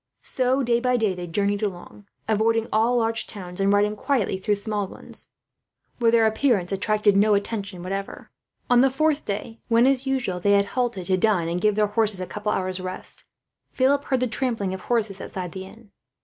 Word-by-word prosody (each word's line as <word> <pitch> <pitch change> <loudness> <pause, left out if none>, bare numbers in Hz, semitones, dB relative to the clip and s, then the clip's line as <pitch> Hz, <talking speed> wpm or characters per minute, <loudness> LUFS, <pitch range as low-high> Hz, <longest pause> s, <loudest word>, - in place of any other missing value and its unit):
So 260 +1 0
day 235 -1 +2
by 250 0 +1
day 215 -4 +1
they 180 -1 -6
journeyed 200 +4 0
along, 200 0 -6 0.2
avoiding 225 +1 +1
all 230 +3 +3
large 225 -1 0
towns, 180 -3 -8
and 195 0 +3
riding 205 +1 +2
quietly 215 -5 0
through 205 +2 +1
small 205 -1 -3
ones, - - -8 0.7
where 235 -1 +4
their 230 -1 +4
appearance 220 -5 +1
attracted 210 +1 +2
no 205 +1 +4
attention 200 -3 -3
whatever. 195 +2 -5 0.4
On 245 0 +5
the 270 - +5
fourth 305 +2 0
day 215 +3 -5
when, 235 +1 +4
as 270 0 +2
usual, 245 -9 -1
they 200 +3 +3
had 200 0 +4
halted 240 -7 -1
to 185 0 +2
dine 185 -4 +2
and 175 +2 -2
give 210 0 +2
their 210 0 +3
horses 210 -1 0
a 185 - -3
couple 210 +2 -3
of - - +1
hours' 185 0 -3
rest, 185 0 -8 0.5
Philip 275 +2 +2
heard 260 -2 0
the 255 - +2
trampling 225 -5 -2
of 190 - -6
horses 215 -4 -1
outside 180 -2 -6
the 190 +1 -7
inn. 215 +1 -16
210 Hz, 200 wpm, -24 LUFS, 195-235 Hz, 0.7 s, On